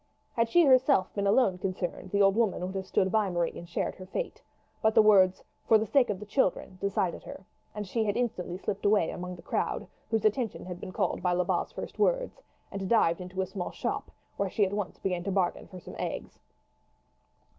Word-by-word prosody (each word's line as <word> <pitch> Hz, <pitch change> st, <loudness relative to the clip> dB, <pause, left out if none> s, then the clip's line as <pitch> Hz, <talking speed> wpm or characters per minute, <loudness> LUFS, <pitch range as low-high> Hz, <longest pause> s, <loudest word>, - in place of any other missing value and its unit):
Had 230 Hz, -1 st, +1 dB
she 345 Hz, +7 st, +5 dB
herself 260 Hz, -6 st, +4 dB
been 200 Hz, -1 st, 0 dB
alone 200 Hz, -4 st, +3 dB
concerned, 185 Hz, -1 st, -4 dB
the 200 Hz, +1 st, +3 dB
old 195 Hz, 0 st, +4 dB
woman 215 Hz, -5 st, +1 dB
would 185 Hz, -, -5 dB
have 190 Hz, -1 st, -4 dB
stood 190 Hz, -1 st, +1 dB
by 215 Hz, -3 st, +2 dB
Marie 175 Hz, -2 st, -1 dB
and 170 Hz, -, -9 dB
shared -, -, -2 dB
her 185 Hz, -, -10 dB
fate; -, -, -4 dB, 0.4 s
but 220 Hz, +1 st, +2 dB
the 220 Hz, -, +8 dB
words 190 Hz, -3 st, +5 dB, 0.2 s
"for 225 Hz, -, +7 dB
the 215 Hz, -, -1 dB
sake 255 Hz, +1 st, +3 dB
of 200 Hz, -3 st, -2 dB
the 210 Hz, -, -8 dB
children" 195 Hz, -4 st, 0 dB
decided 195 Hz, -3 st, -1 dB
her, 190 Hz, -, -10 dB, 0.3 s
and 210 Hz, -1 st, -4 dB
she 225 Hz, +4 st, 0 dB
had 205 Hz, +1 st, 0 dB
instantly 185 Hz, -7 st, -2 dB
slipped 195 Hz, +1 st, -4 dB
away 200 Hz, -5 st, +3 dB
among 180 Hz, 0 st, -6 dB
the 170 Hz, -, -14 dB
crowd, -, -, -2 dB, 0.2 s
whose 225 Hz, -1 st, 0 dB
attention 220 Hz, +1 st, 0 dB
had 180 Hz, -1 st, -6 dB
been 185 Hz, -, -7 dB
called -, -, -1 dB
by 180 Hz, 0 st, +1 dB
Lebat's 180 Hz, 0 st, 0 dB
first -, -, -7 dB
words, -, -, +1 dB, 0.3 s
and 195 Hz, -1 st, -4 dB
dived 175 Hz, -7 st, +3 dB
into 180 Hz, +1 st, -4 dB
a -, -, 0 dB
small 185 Hz, -1 st, -5 dB
shop, -, -, -3 dB, 0.3 s
where 200 Hz, -1 st, 0 dB
she 205 Hz, +2 st, +2 dB
at 190 Hz, -, -4 dB
once 205 Hz, -2 st, -3 dB
began 180 Hz, -2 st, -2 dB
to 195 Hz, -, -2 dB
bargain 185 Hz, -2 st, 0 dB
for 185 Hz, -, -10 dB
some -, -, -11 dB
eggs. -, -, -5 dB
195 Hz, 215 wpm, -29 LUFS, 185-220 Hz, 0.4 s, the